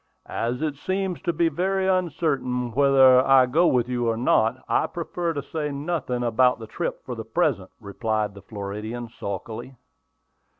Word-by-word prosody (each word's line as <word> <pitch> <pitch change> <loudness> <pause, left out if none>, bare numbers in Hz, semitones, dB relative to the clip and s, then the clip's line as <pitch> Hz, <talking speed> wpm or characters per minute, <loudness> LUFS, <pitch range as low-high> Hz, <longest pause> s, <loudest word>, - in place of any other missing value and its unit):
"As 120 +5 -3
it 150 -2 -2
seems 190 +3 -2
to 175 - 0
be 170 +1 +1
very 190 +4 0
uncertain 150 -9 0
whether 130 0 +6
I 135 -1 +6
go 160 +8 +3
with 125 -2 +2
you 120 -2 0
or 115 - -1
not, 115 0 +2
I - - +2
prefer 170 0 -3
to 145 -2 -4
say 150 -2 -3
nothing 140 -4 -2
about 125 +2 +3
the 115 - -8
trip 165 +10 -4
for 125 - -5
the 115 -2 -6
present," 110 - 0
replied 110 0 -2
the 100 - -12
Floridian, 110 +4 -6
sulkily. 110 +5 -6
130 Hz, 165 wpm, -24 LUFS, 115-160 Hz, -, whether